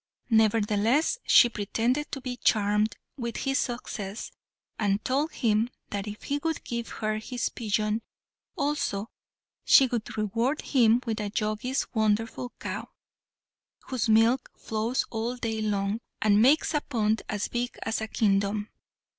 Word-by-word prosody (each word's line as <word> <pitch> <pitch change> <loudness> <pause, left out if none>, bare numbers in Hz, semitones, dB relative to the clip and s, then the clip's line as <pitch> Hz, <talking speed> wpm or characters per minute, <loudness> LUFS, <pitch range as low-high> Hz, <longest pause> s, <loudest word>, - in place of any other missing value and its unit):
Nevertheless 220 - +3
she 240 - +8
pretended 235 +6 -1
to 270 - -4
be 250 -1 -4
charmed 210 -2 +2 0.2
with 235 -3 -4
his 270 0 0
success, 220 -4 -4 0.5
and 205 -1 0
told 285 +5 +1
him 220 0 +1 0.2
that 200 0 -3
if 210 0 -7
he 285 +1 -1
would 325 +1 -2
give 235 -1 -4
her 215 -1 -2
this 245 +2 -2
pigeon 215 0 -1 0.6
also, 280 - -1 0.5
she 270 - +7
would 235 -4 -3
reward 230 +7 0
him 240 -2 +4
with 225 -2 -2
the 210 -1 -2
Jogi's 215 +5 -1
wonderful 225 +2 0
cow, - - -5 1.0
whose 245 -4 -1
milk 225 +4 +4
flows 225 +3 -1
all 230 +2 -2
day 225 -3 -3
long, 205 0 0 0.2
and 210 -1 +4
makes 290 +6 +4
a 295 - +2
pond 220 -5 0
as 205 -1 -1
big 245 +1 -3
as 225 0 -1
a 220 - -2
kingdom. 205 -1 +1
225 Hz, 140 wpm, -27 LUFS, 210-250 Hz, 1.0 s, she